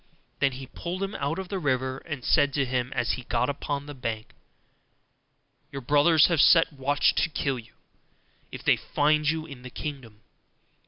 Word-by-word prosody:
Then 135 Hz, -2 st, +2 dB
he 130 Hz, +1 st, -7 dB
pulled 175 Hz, +8 st, -5 dB
him 195 Hz, +1 st, -3 dB
out 145 Hz, 0 st, -2 dB
of 190 Hz, -1 st, -6 dB
the 195 Hz, -, -2 dB
river, 130 Hz, -3 st, -1 dB
and 145 Hz, -6 st, -5 dB
said 145 Hz, -1 st, +3 dB
to 140 Hz, -1 st, +1 dB
him, 125 Hz, 0 st, -2 dB
as 125 Hz, -2 st, 0 dB
he -, -, -3 dB
got 125 Hz, +1 st, 0 dB
upon 140 Hz, 0 st, -4 dB
the 145 Hz, -, -8 dB
bank, 115 Hz, -4 st, -5 dB, 1.4 s
'Your 140 Hz, -, -6 dB
brothers 150 Hz, +4 st, +5 dB
have 170 Hz, -5 st, +3 dB
set 165 Hz, -2 st, +5 dB
watch 145 Hz, +1 st, +2 dB
to 170 Hz, -, +2 dB
kill 135 Hz, -3 st, -2 dB
you, 110 Hz, -1 st, -15 dB, 0.8 s
if -, -, -8 dB
they -, -, +4 dB
find 150 Hz, +1 st, +1 dB
you 160 Hz, 0 st, -1 dB
in 140 Hz, -5 st, -11 dB
the 130 Hz, -, -9 dB
kingdom. 125 Hz, -7 st, -7 dB
140 Hz, 180 wpm, -26 LUFS, 130-155 Hz, 1.4 s, brothers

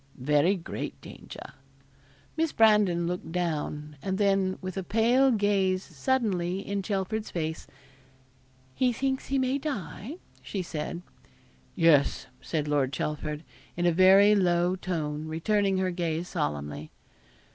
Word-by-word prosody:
'Very 150 Hz, +8 st, +2 dB
great 175 Hz, -, -6 dB
danger.' -, -, -11 dB, 0.8 s
Miss 325 Hz, -1 st, 0 dB
Brandon 210 Hz, -6 st, +4 dB
looked 175 Hz, -1 st, -4 dB
down, 150 Hz, -3 st, -3 dB
and 190 Hz, -1 st, -2 dB
then, 195 Hz, -2 st, +2 dB
with 185 Hz, -1 st, -6 dB
a 190 Hz, -, -2 dB
pale 235 Hz, +7 st, +3 dB
gaze 200 Hz, -4 st, +1 dB
suddenly 185 Hz, -, -1 dB
in 200 Hz, 0 st, -3 dB
Chelford's 205 Hz, +2 st, -2 dB
face 160 Hz, -2 st, -4 dB, 1.1 s
'He 255 Hz, -, +2 dB
thinks 265 Hz, +2 st, -2 dB
he 275 Hz, -, 0 dB
may 260 Hz, +1 st, +1 dB
die?' 245 Hz, -, -5 dB, 0.3 s
said 175 Hz, -2 st, -4 dB, 0.7 s
she. -, -, -12 dB
'Yes,' 150 Hz, -4 st, +4 dB, 0.2 s
said 150 Hz, -2 st, -2 dB
Lord 145 Hz, -3 st, +1 dB
Chelford, 150 Hz, +2 st, -3 dB, 0.3 s
in 175 Hz, -, 0 dB
a 175 Hz, -, +5 dB
very 190 Hz, +4 st, +6 dB
low 175 Hz, -2 st, +2 dB
tone, 155 Hz, -5 st, -3 dB
returning 195 Hz, +4 st, +1 dB
her 185 Hz, -1 st, 0 dB
gaze 170 Hz, -1 st, -2 dB
solemnly. 75 Hz, +1 st, -3 dB
185 Hz, 125 wpm, -28 LUFS, 160-205 Hz, 1.1 s, very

